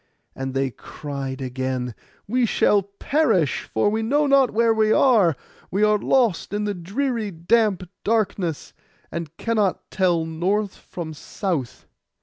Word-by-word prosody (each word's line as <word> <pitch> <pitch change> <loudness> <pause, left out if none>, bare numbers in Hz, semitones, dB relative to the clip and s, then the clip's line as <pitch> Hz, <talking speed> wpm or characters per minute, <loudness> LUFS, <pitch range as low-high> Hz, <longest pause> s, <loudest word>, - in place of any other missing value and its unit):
And 135 0 -4
they 135 -1 0
cried 140 0 -6
again, 130 -1 -3 0.3
'We 245 +2 +2
shall 205 -1 +3
perish, 200 - 0
for 110 - +2
we 220 +1 0
know 285 +7 +2
not 275 -3 +5
where 230 +1 +3
we 220 -1 +2
are. 215 - +4 0.3
We 200 +3 +1
are 210 0 +4
lost 235 -9 +1
in 210 0 -1
the 205 0 -1
dreary 220 +5 -2
damp 190 +1 +1 0.2
darkness, 200 -7 -1 0.4
and 165 -1 -6
cannot 215 -5 -1
tell 175 -4 +2
north 185 +5 -1
from 165 -3 -7
south. 155 - -4
195 Hz, 135 wpm, -23 LUFS, 160-220 Hz, 0.4 s, not